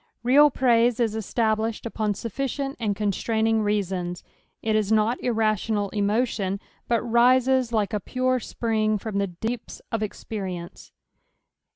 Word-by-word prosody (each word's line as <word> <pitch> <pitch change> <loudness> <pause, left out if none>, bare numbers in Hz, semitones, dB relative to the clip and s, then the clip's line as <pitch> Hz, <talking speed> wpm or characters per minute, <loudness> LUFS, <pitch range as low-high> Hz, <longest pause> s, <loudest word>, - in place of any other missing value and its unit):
Real 285 +5 +6
praise 240 -2 +3
is 225 -3 +1
established 220 +1 -1
upon 215 -2 -1
sufficient 275 +5 -3
and 210 -3 0
constraining 220 +2 +1
reasons; 190 -4 -1 0.4
it 220 -1 +1
is 215 -1 +1
not 220 +3 +2
irrational 215 -3 0
emotion, 205 -2 0 0.3
but 235 -2 +1
rises, 250 +1 +3
like 215 -3 0
a 210 - +1
pure 255 +4 0
spring, 220 -2 0
from 205 0 -3
the 200 - +1
deeps 220 +7 -5
of 225 - -1
experience. 190 -4 -6
220 Hz, 130 wpm, -25 LUFS, 205-240 Hz, 0.4 s, Real